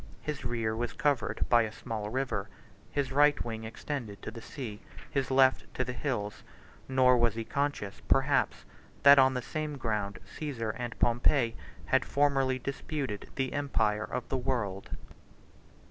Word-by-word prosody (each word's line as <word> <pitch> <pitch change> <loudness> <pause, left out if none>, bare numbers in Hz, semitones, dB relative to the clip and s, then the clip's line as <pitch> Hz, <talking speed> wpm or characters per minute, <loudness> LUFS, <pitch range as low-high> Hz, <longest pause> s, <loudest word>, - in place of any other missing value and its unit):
His 150 -2 -4
rear 115 -2 -1
was 120 0 -2
covered 140 -6 0
by 120 -1 +6
a 110 -2 -2
small 110 -2 -5
river; 120 -5 -2 0.4
his 140 -2 -1
right 145 +1 +5
wing 110 -1 -5
extended 115 -2 -5
to - - -5
the 115 +1 -9
sea; 110 -5 -7 0.3
his 135 -3 0
left 130 0 +4
to 130 - +1
the 125 0 -4
hills: 120 -6 -3 0.5
nor 130 -1 +5
was 120 -2 +3
he 115 - -2
conscious, 140 -6 -2
perhaps, - - +2 0.4
that 140 0 +9
on 130 0 +5
the 125 - -2
same 155 0 -3
ground 105 -5 -2
Caesar 115 -2 -4
and 120 0 -5
Pompey 120 0 +3 0.3
had - - +3
formerly 135 -2 +2
disputed 135 -4 -4
the 130 -1 -1
empire 110 -7 +1
of 125 -2 -4
the 135 - 0
world. 115 -7 -2
125 Hz, 155 wpm, -30 LUFS, 110-135 Hz, 0.5 s, that